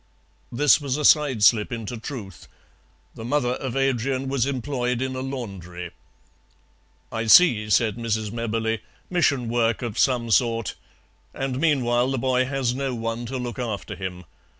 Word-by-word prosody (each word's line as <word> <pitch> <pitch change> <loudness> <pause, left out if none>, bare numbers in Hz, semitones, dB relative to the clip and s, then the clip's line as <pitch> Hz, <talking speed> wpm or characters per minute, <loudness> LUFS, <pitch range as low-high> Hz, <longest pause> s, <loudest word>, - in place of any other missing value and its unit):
This 145 +5 +4
was 140 -1 -2
a 150 - -1
side 140 -8 +4
slip 105 0 +4
into 115 0 -4
truth. 110 - -8 0.7
The 110 - -9
mother 125 +1 0
of 125 0 -3
Adrian 135 0 0
was 135 -2 0
employed 125 -2 -2
in 130 0 -2
a - - -3
laundry. 95 -10 -6 1.2
"I 115 0 -3
see," 110 -6 +6
said 110 +1 +2
Mrs. 110 -2 -2
Mebberley, 115 -1 -2 0.3
"mission 140 -8 +2
work 115 0 0
of 115 -3 -4
some 120 -3 +2
sort. 115 -2 +2 0.6
And 135 -1 -3
meanwhile 125 -5 +2
the 135 - -1
boy 130 0 +1
has 130 -2 -1
no 135 -1 -2
one 115 +1 -4
to 130 +2 -4
look 125 0 -5
after 110 -5 -4
him. 90 -2 -6
120 Hz, 150 wpm, -24 LUFS, 115-135 Hz, 1.2 s, see